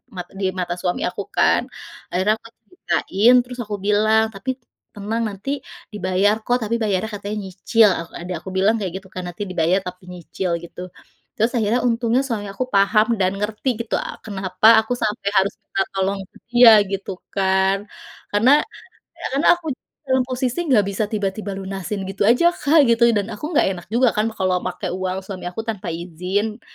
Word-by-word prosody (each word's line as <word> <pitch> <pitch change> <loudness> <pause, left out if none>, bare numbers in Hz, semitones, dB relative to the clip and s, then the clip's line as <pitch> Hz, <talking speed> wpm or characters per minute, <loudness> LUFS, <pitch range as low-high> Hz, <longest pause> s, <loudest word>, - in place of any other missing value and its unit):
mat 180 -1 -6
di 195 - -1
mata 175 -1 -2
suami 180 -1 -1
aku, - - -5
kan. - - +4 0.5
Akhirnya 190 +4 +2
aku 230 - -14 0.2
ceritain, 240 - +2
terus 250 0 -10
aku 210 -1 -4
bilang, 215 +2 +3
"Tapi 195 +6 -6 0.5
tenang, 210 +3 -2
nanti 240 +9 -4 0.3
dibayar, 195 +1 +2
kok. 245 - +2
Tapi 220 +2 -1
bayarnya 205 +1 -1
katanya 205 +1 -5
nyicil." 205 +4 +3
Ak 165 - -6 0.2
adik 180 +1 -4
aku 190 - -9
bilang 200 +4 +3
kayak 190 -4 -3
gitu - - -16
kan, 185 - -4
nanti 175 +3 -8
dibayar 175 +2 +2
tapi 180 +1 -8
nyicil, 180 +1 -4
gitu. 170 +1 -10 0.5
Terus 225 +3 +1
akhirnya 225 +2 +1
untungnya 235 +2 +1
suami 220 -5 -3
aku 200 - -2
paham 210 +2 +4
dan 185 -1 +2
ngerti 210 +5 -2
gitu, 230 - -2
a - - -5
kenapa 190 -1 +1
aku 220 +3 -1
sampai 210 -2 -2
harus 195 +1 +3
minta 195 - -2
tolong 195 +1 -1
ke - - -17
dia, 240 -1 +8 0.2
gitu 195 0 -3 0.2
kan. 190 0 +2 0.5
Karena 220 +6 +4 0.7
ya, - - -5
karena 280 - +2
aku 340 - -14 0.4
dalam 260 -1 +2
posisi 255 0 -2
enggak 215 -6 +4
bisa 200 +2 -1
tiba-tiba 205 -1 -3
lunasin 195 +1 -4
gitu 195 - -3
aja 250 +8 +4
Kak, 300 -2 +4
gitu. 230 0 +2
Dan 200 -1 0
aku 210 - -8
enggak - - +5
enak 175 -2 -9
juga 250 +1 +4
kan 210 +1 +2
kalau 185 -1 +1
pakai 185 - -4
uang 185 0 -2
suami 190 -2 -7
aku 220 +5 -5
tanpa 205 -4 -4
izin. 180 +6 -3
205 Hz, 180 wpm, -21 LUFS, 190-225 Hz, 0.7 s, dia